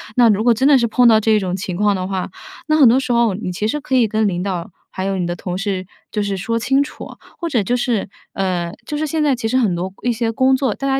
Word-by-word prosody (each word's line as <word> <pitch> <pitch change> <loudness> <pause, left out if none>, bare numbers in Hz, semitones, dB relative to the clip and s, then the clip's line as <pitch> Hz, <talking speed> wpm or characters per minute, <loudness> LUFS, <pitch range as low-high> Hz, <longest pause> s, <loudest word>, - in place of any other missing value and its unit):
那 240 -2 +5
如 210 0 +2
果 240 0 +5
真 260 +5 +1
的 285 -2 +6
是 235 -2 +1
碰 245 +2 +4
到 220 -2 +6
这 220 0 +2
种 185 -2 -2
情 185 -1 -4
况 205 +2 +2
的 185 -1 -3
话， 190 -1 -3 0.4
那 310 0 +3
很 280 -5 +7
多 240 +3 +5
时 265 - -3
候 235 -3 +3
你 185 -1 -4
其 210 +4 -2
实 295 +7 -1
可 270 -2 -2
以 245 -3 +4
跟 215 0 +1
领 180 -2 -2
导， 185 -2 -4 0.2
还 185 - -4
有 195 0 -1
你 180 - -1
的 175 - -3
同 180 0 -5
事， 195 -1 -3 0.3
就 210 - -1
是 200 -1 -2
说 230 +5 -2
清 270 +4 +2
楚。 290 - -9 0.3
或 340 - -3
者 245 -8 +1
就 240 +6 0
是 235 -5 -1 0.2
呃， 180 -3 -2
就 295 - -4
是 310 - -1
现 310 +1 -1
在 285 -3 +2
其 235 -2 -3
实 255 - +1
很 215 -9 +2
多 185 +2 -4
一 245 - +1
些 230 0 -1
工 260 +3 +3
作， 260 -4 0
大 275 - -4
家 270 0 +1
220 Hz, 310 characters per minute, -19 LUFS, 190-255 Hz, 0.4 s, 很